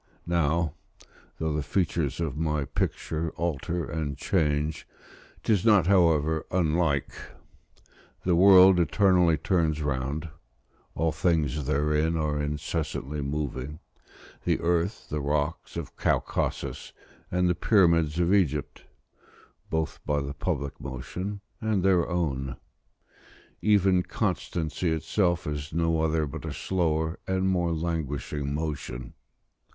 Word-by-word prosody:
Now, 85 -2 +1 0.6
though 80 -1 -1
the 75 - 0
features 80 -3 -1
of 80 -5 -2
my 75 -2 -1
picture 80 +3 -2
alter 85 0 -2
and 75 -2 -3
change, 75 -3 0 0.6
'tis 105 -5 +2
not, 105 -6 +5
however, 80 -4 +3
unlike: 80 -5 +1 1.1
the 90 -2 +3
world 95 0 +8
eternally 90 0 +4
turns 80 -1 +1
round; 75 +3 -2 0.7
all 80 0 +1
things 75 -5 0
therein 75 +3 +1
are 75 -2 0
incessantly 75 -1 -3
moving, 70 0 -3 0.7
the - - +1
earth, 85 +4 0
the 75 0 -2
rocks 75 +3 -2
of - - -6
Caucasus, - - -1 0.4
and 90 0 +1
the 90 - +3
pyramids 85 -4 +3
of 90 +2 +3
Egypt, 75 -8 0 0.8
both 80 0 -2
by 75 -1 +2
the 70 0 -4
public 70 0 -3
motion 90 +10 -5 0.2
and 110 -4 0
their 95 -3 +3
own. 70 -7 -2 1.0
Even 95 -3 +4
constancy 85 -1 -2
itself 85 +3 0
is 75 +1 -4
no 80 0 +1
other 80 -1 +1
but 70 - -7
a - - -4
slower 80 -3 -1
and 95 0 +1
more 90 -2 +1
languishing 75 -3 -2
motion. 70 -5 -4
80 Hz, 115 wpm, -27 LUFS, 75-90 Hz, 1.1 s, world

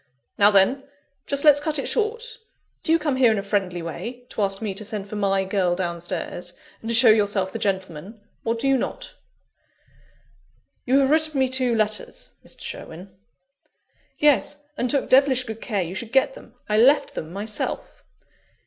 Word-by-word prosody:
Now 205 0 +5
then! 210 +8 +3 0.4
just 280 +1 0
let's 290 -1 +7
cut 305 +1 -1
it 275 - -2
short 465 +2 -1 0.4
do 320 - -1
you 330 - +6
come 300 -4 -1
here 250 -3 +5
in 220 - 0
a 200 - -2
friendly 190 -4 -2
way, 240 +9 -7
to - - -4
ask 195 -1 0
me 215 -3 -3
to 205 +3 -5
send 205 -1 -5
for 210 - -7
my 195 -2 +1
girl 185 -2 0
downstairs, 175 0 -4 0.3
and 225 - -6
to 230 - +2
show 230 -1 +7
yourself 205 -3 +1
the - - -4
gentleman, 190 +1 -3 0.2
or 230 0 0
do 235 +4 -2
you 270 0 +4
not?" - - -5 1.7
"You 260 +2 +4
have 270 +1 +2
written 310 -2 +2
me 265 - +3
two 255 -2 +2
letters, 215 -1 -2
Mr. - - -6
Sherwin 185 +4 -8 0.5
" - - -50 0.3
"Yes: 290 0 +2
and 250 -3 -1
took 280 0 +1
devilish 260 -1 +4
good 225 -2 -8
care 205 -5 -1
you 170 +1 -6
should 220 +4 -5
get 270 - +3
them - - -15
I 210 -1 +1
left 275 +6 +4
them 155 - -6
myself." 210 +3 -4
220 Hz, 185 wpm, -23 LUFS, 195-270 Hz, 1.7 s, let's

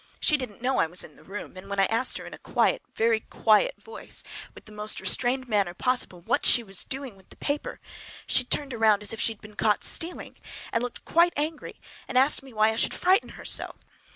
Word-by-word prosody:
She 305 - +4
didn't 250 -5 -6
know 260 +1 +1
I - - +3
was 175 +2 -1
in 150 - -12
the - - -18
room, 195 -1 -8
and 185 +1 -11
when 200 0 -2
I 195 - +5
asked 230 +5 0
her - - -8
in - - -10
a - - -10
quiet, - - +1
a - - -42
very 225 0 +3
quiet 225 - +2
voice, 450 - -5 0.3
with - - -13
the 215 - -13
most 210 0 -1
restrained 260 +1 +2
manner 200 -6 0
possible, 245 -6 0
what - - 0
she 240 - +5
was 195 -3 +2
doing 265 -5 -5
with 190 -1 -22
the - - -14
paper 290 +1 -3 0.5
she 260 - +2
turned 275 +2 -1
around 220 -2 +3
as 210 - -2
if 225 - -4
she 225 - +1
had 210 - -26
been 215 -1 -13
caught 210 -1 +1
stealing, 335 +2 -2 0.4
and 230 - +1
looked 245 -1 -6
quite 340 +1 +4
angry—asked 290 -3 -1
me 270 -1 -14
why 215 -1 +3
I 220 - -5
should - - +1
frighten 375 +4 +2
her - - -11
so! - - +1
230 Hz, 230 wpm, -26 LUFS, 210-270 Hz, 0.5 s, I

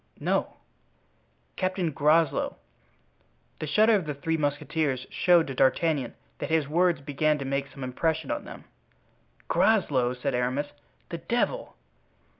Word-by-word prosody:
"No." - - 0 1.0
"Captain 185 -3 -1
Groslow." 155 +2 +2 1.0
The 155 - -4
shudder 215 +8 +4
of 190 -7 +1
the 150 - -3
three 160 +4 -1
musketeers 145 -2 -1
showed 175 -2 +4
to 135 - -5
D'Artagnan 135 0 +1 0.2
that - - -4
his 160 -3 +2
words 170 0 +2
began 150 +2 +1
to 140 - -5
make 140 +1 -1
some 135 - -10
impression 155 +4 -1
on - - -2
them. - - -10 0.8
"Groslow!" 135 - +2
said 130 +2 -2
Aramis; 125 +4 -1 0.4
"the - - -5
devil! - - -1
150 Hz, 130 wpm, -27 LUFS, 135-165 Hz, 1.0 s, shudder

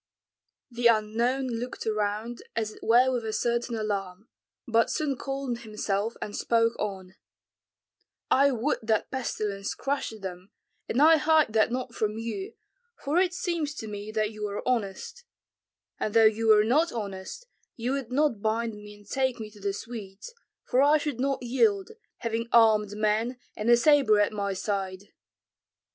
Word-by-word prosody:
The 240 0 +2
unknown 230 +4 +1
looked 245 0 -4
around 215 +2 -2
as 220 -2 -1
it - - -15
were 245 +3 +4
with 245 -2 -1
a 220 - -3
certain 235 +1 -1
alarm, 205 -2 -4 0.4
but 230 -1 +3
soon 295 -3 -1
calmed 270 -2 -4
himself 215 -1 -2
and 205 - -6
spoke 230 0 +2
on, 190 -2 -5 1.1
"I 280 +1 +5
would 260 +3 0
that 220 -1 0
pestilence 210 -6 -3
crushed 270 -6 -3
them, 185 0 -7 0.4
and 245 - 0
I 320 +1 +7
hide 310 -6 +3
that 220 +1 +3
not 250 -1 -3
from 215 -1 -1
you, 385 - -5 0.4
for 305 +5 0
it 365 -1 +2
seems 330 -5 -2
to 220 - -6
me 205 0 -6
that 215 -1 0
you 210 -1 -4
are 200 0 -5
honest; 235 - -2 0.8
and 215 - -2
though 225 -1 +7
you 220 +1 +3
were 215 -1 +7
not 300 +10 +2
honest, 205 - -6 0.3
you 240 +2 -2
would 270 -3 -3
not 270 -6 +1
bind 225 +1 0
me 210 0 -11
and 205 0 -19
take 260 -1 0
me 215 -1 -7
to 210 - -16
the 200 0 -1
Swedes, 210 - -8 0.3
for 255 +1 +2
I 295 +2 +5
should 290 -5 -4
not 270 0 -1
yield, 390 - +1 0.3
having 230 0 -3
armed 215 -3 +5
men, 215 +4 0 0.2
and 215 +2 -2
a 240 - +7
sabre 270 -6 +5
at 205 +1 +2
my 200 -1 -2
side." 195 0 -3
230 Hz, 165 wpm, -27 LUFS, 210-260 Hz, 1.1 s, I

